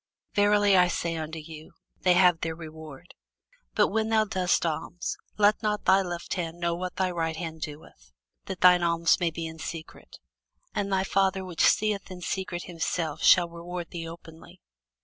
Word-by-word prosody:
Verily 205 -1 +4
I 180 -1 +6
say 170 -1 -2
unto 160 0 -5
you, 155 0 -10 0.3
They 180 - +4
have 180 -2 +5
their 160 0 -2
reward. 160 -3 -11 0.6
But - - +4
when 220 +1 0
thou 220 -1 +3
doest 185 -3 +1
alms, 165 +2 -3 0.2
let 210 0 +4
not 210 -1 -1
thy 190 +1 +5
left 175 -2 -4
hand 170 -2 -4
know 170 -1 0
what 180 +1 -4
thy 185 -1 0
right 165 -2 -2
hand 160 -1 -6
doeth: 145 - -9 0.3
that 190 -2 -6
thine 180 -1 +7
alms 170 -1 +2
may 175 -2 +1
be 165 +1 -5
in 160 0 -8
secret: 160 0 -8 0.6
and 200 -1 -2
thy 190 0 +2
Father 195 -1 +1
which 175 -3 -3
seeth 210 -2 +2
in 180 -1 -9
secret 180 -1 -3
himself 165 -2 -3
shall 175 -2 +6
reward 170 0 -7
thee 165 -1 -5
openly. 165 -1 -13
175 Hz, 175 wpm, -27 LUFS, 165-190 Hz, 0.6 s, thine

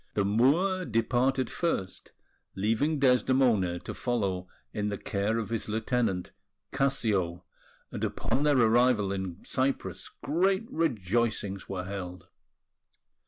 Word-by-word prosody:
The 100 - +2
Moor 155 - +3
departed 130 +1 +1
first, 95 - -2 0.4
leaving 115 +10 +1
Desdemona 125 -8 +3
to - - -6
follow 100 -7 -1 0.3
in 105 0 -1
the 100 - -3
care 100 +4 -1
of 110 -3 -3
his 115 -2 -2
lieutenant, 110 -4 -1 0.4
Cassio; 100 -10 0 0.5
and - - -5
upon 135 - -1
their 145 -2 +3
arrival 115 -3 +4
in 95 -3 -5
Cyprus 130 +1 -1
great 190 - +1
rejoicings 110 - -1
were 95 -2 -3
held. 90 -2 -7
115 Hz, 115 wpm, -29 LUFS, 100-130 Hz, 0.5 s, arrival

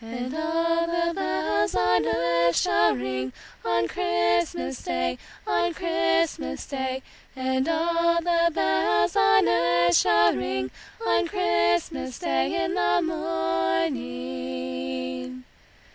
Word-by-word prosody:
And 245 +3 -5
all 330 +1 0
the 340 0 0
bells 105 - -1
on 90 0 +2
earth 170 +7 +2
shall 85 - +3
ring 130 0 -3 0.3
On 115 0 +1
Christmas 85 -1 0
day, 85 0 -2 0.3
on 350 -1 0
Christmas 335 -1 0
day; 265 -1 -4 0.3
And 260 +2 -1
all 335 +1 +2
the 340 0 +2
bells 85 - +1
on 110 0 +4
earth 170 +8 +3
shall 85 - +4
ring 130 +1 -3 0.3
On 115 0 +2
Christmas 85 0 0
day 65 -1 0
in - - -2
the 70 0 +2
morning. 85 +5 -3
115 Hz, 105 wpm, -25 LUFS, -, 0.3 s, on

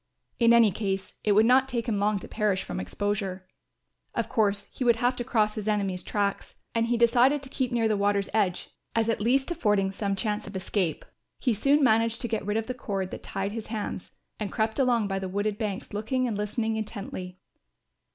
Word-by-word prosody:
In 235 -1 +5
any 230 -3 +6
case 195 -1 -3
it 210 - +3
would 215 +2 +5
not 260 +2 +4
take 235 -2 -2
him 210 -4 0
long 205 +1 +2
to 190 - -8
perish 210 -3 0
from - - -5
exposure. 190 - -3 0.7
Of - - -1
course, 205 -4 +1
he - - -4
would 235 -2 +5
have 245 +2 +1
to 240 - -2
cross 215 -4 +1
his 215 -1 -5
enemies' 200 -4 0
tracks 200 -1 -2 0.2
and 230 0 +1
he 240 0 +1
decided 245 +5 +4
to 270 - -10
keep 260 -2 -1
near 235 -2 +2
the 215 - +2
water's 200 0 +1
edge 195 -5 0 0.2
as 225 0 +2
at 225 - 0
least 265 +7 +2
affording 210 - +1
some 200 0 -2
chance 210 +1 -2
of 200 - -9
escape. 185 -3 -1 0.3
He 250 - +1
soon 275 +7 +3
managed 230 -1 +3
to 240 - -1
get 220 -2 -2
rid 210 +2 -1
of 225 - -1
the 255 - -3
cord 195 -6 -3
that - - -6
tied 195 +1 -3
his 220 0 -6
hands 215 -4 -4 0.3
and 210 -3 -3
crept 220 +3 -1
along 240 -5 +3
by 195 -1 -1
the 190 -1 -4
wooded 205 +2 -1
banks 205 -4 -4
looking 250 +5 0
and 225 - -2
listening 220 +2 -1
intently. 195 -4 -6
215 Hz, 210 wpm, -27 LUFS, 200-235 Hz, 0.7 s, any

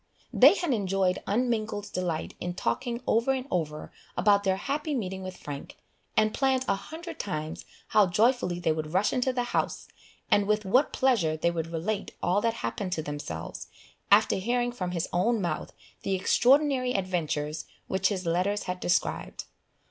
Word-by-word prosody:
They 280 +9 +8
had 345 -8 0
enjoyed 195 -3 +1
unmingled 215 -2 -1
delight 175 -3 -2
in 175 0 -4
talking 240 +4 -2
over 235 +4 +2
and 260 -1 -3
over 155 -4 -2 0.3
about 200 0 +4
their 190 -1 +2
happy 285 +8 -2
meeting 190 -5 -3
with 185 -1 -7
Frank, 145 -1 -8 0.4
and 215 0 +3
planned 265 -1 +1
a - - +3
hundred 325 - -7
times 155 -5 -4 0.2
how 210 -2 +5
joyfully 210 -2 +2
they 165 -2 +1
would 155 +1 -3
rush 205 +2 +3
into 260 0 +1
the 250 -1 -1
house, 245 - -2 0.4
and 205 -1 +4
with 210 0 +1
what 255 +9 +3
pleasure 205 -13 +2
they 170 +2 +1
would 165 -1 -3
relate 170 +6 -3
all 190 +4 +2
that 230 0 +1
happened 180 - -2
to 160 - -2
themselves, 95 - -6 0.4
after 205 0 +5
hearing 240 +5 0
from 185 -7 -4
his 170 -2 -2
own 220 +6 +2
mouth 170 -5 -2 0.3
the 195 - 0
extraordinary 255 +5 +3
adventures 165 -5 -2 0.2
which 190 0 +1
his 190 -3 -3
letters 185 +5 0
had 180 0 -4
described. 180 0 -1
195 Hz, 165 wpm, -28 LUFS, 175-240 Hz, 0.4 s, They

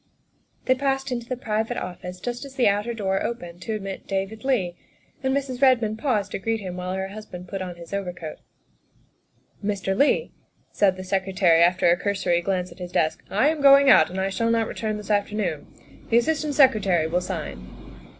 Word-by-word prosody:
They 255 - +4
passed 270 0 -1
into 240 -1 -4
the 255 - -2
private 225 0 -2
office 180 0 -6
just 245 +5 -4
as 275 -1 -10
the 255 - +3
outer 205 +3 +1
door 195 -4 -1
opened 175 -7 -5
to 220 - -3
admit 195 -2 -6
David 195 +3 -3
Leigh, 205 -11 0 0.5
and 265 -1 0
Mrs. 265 -2 -2
Redmond 230 -5 +3
paused 210 -8 0
to - - -3
greet 225 +2 -1
him 185 -3 -6
while 180 0 -4
her 190 0 -3
husband 195 -3 -9
put 195 +1 -5
on 180 -2 -5
his 170 +2 -11
over 200 -2 -2
coat. 165 -3 -8 0.7
" - - -36
Mr. 195 -2 -1
Leigh," 290 - +2 0.4
said 190 -2 +2
the 185 - -6
Secretary, 185 -3 +2
after 175 +1 +4
a 175 - +3
cursory 185 -3 0
glance 185 0 -2
at - - -14
his 180 -1 -6
desk, 155 -3 0
" - - -30
I 220 +9 +3
am 310 -2 -2
going 275 0 +8
out - - +6
and 185 - -4
I 190 +1 0
shall 230 +3 0
not 230 -1 +2
return 215 -1 -3
this 210 0 -6
afternoon. 205 -6 -1 0.4
The 230 - +4
Assistant 300 +3 0
Secretary 210 - +4
will 175 +3 0
sign." 180 - -5
205 Hz, 200 wpm, -24 LUFS, 185-240 Hz, 0.7 s, going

